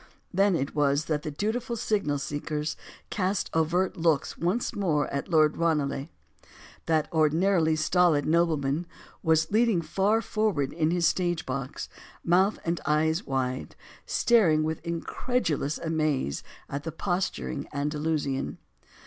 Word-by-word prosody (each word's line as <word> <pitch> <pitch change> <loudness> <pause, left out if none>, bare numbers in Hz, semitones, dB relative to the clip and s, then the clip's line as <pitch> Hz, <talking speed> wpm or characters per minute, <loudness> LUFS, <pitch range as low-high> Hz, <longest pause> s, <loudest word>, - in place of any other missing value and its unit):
Then 195 0 +3
it 140 -3 -2
was 145 0 +2
that 150 -2 -1
the 155 - -4
dutiful 225 - -2
signal 200 -10 0
seekers 150 +1 -3 0.4
cast 190 -1 -1
covert 170 +4 +1
looks 165 -3 +1
once 180 +9 -1
more 160 -8 +1
at 140 - -2
Lord 155 -2 +4
Ranelagh. 150 -4 0 0.8
That 155 -2 +2
ordinarily 160 +1 +3
stolid 155 -1 +3
nobleman 160 -1 +1 0.3
was 160 +1 +2
leaning 215 -5 +3
far 200 +6 +2
forward 205 -13 0
in 160 -1 +1
his 175 0 +1
stage 175 -2 +1
box, 130 +1 -4 0.4
mouth 185 +4 +3
and 170 0 -1
eyes 160 +4 +1
wide, 130 -1 -2 0.3
staring 175 -10 +4
with 160 0 -3
incredulous 165 - -1
amaze 155 - -1 0.3
at 140 - -4
the 165 - -4
posturing 160 - -2
Andalusian. 150 -1 -2
160 Hz, 125 wpm, -27 LUFS, 150-180 Hz, 0.8 s, Lord